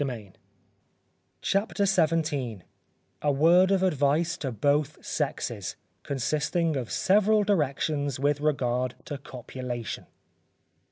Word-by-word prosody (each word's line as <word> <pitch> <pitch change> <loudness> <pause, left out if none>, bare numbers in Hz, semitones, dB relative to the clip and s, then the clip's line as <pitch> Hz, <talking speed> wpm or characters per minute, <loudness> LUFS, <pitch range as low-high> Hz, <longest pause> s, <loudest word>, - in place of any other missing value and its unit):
CHAPTER 200 +1 +1
XVII 155 - +1 0.6
_A 145 -2 +1
word 175 +6 +5
of 195 -1 +2
Advice 155 0 +2
to 135 -4 -3
both 145 +6 0
Sexes, 120 - -3 0.3
consisting 150 +4 0
of 125 -4 -3
several 210 +2 +3
Directions 145 - 0
with 145 +1 +1
regard 130 -4 0
to 145 - -5
Copulation. 125 -3 -6
145 Hz, 95 wpm, -27 LUFS, 130-170 Hz, 0.6 s, word